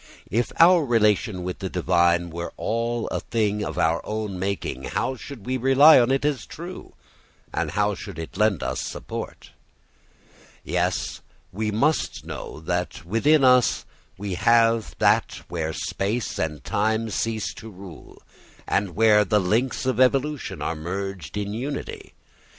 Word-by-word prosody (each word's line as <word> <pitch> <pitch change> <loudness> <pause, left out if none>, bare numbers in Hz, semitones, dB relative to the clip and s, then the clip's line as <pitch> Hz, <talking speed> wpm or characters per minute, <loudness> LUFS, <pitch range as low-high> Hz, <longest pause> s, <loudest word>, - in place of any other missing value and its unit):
If 115 +3 0
our 170 0 +7
relation 105 -5 +2
with 90 0 -5
the 95 - -4
divine 85 -1 +2
were 85 +1 -5
all 115 +1 -1
a - - -2
thing 105 -2 -1
of - - -5
our 80 +1 +2
own 105 -3 -4
making, 95 -9 -3
how 130 - -1
should 130 -4 -10
we 130 +1 -1
rely 135 +5 +7
on 120 0 +3
it 135 +1 +1
as 145 -3 -1
true, 175 +3 -9 0.6
and - - -1
how - - +1
should - - -8
it 80 -1 -7
lend 105 -7 +2
us - - -2
support? - - -7 1.1
Yes, 90 +2 -1 0.3
we 105 +3 -2
must 140 +9 0
know - - -7
that 90 +1 -3
within 135 - +3
us 125 -1 +4 0.3
we 100 0 -4
have 115 +3 +3
that - - +2
where 80 -2 -2
space 105 +8 -3
and 75 -4 -3
time 110 +2 0
cease 110 0 -2
to 110 - -10
rule 95 -5 -13 0.4
and 100 -3 0
where 105 0 +5
the 105 +1 +2
links 115 +9 0
of 130 -1 0
evolution 135 +3 +1
are 80 - -2
merged 90 -1 -5
in 100 0 -3
unity. 135 +6 -5
105 Hz, 150 wpm, -24 LUFS, 90-125 Hz, 1.1 s, our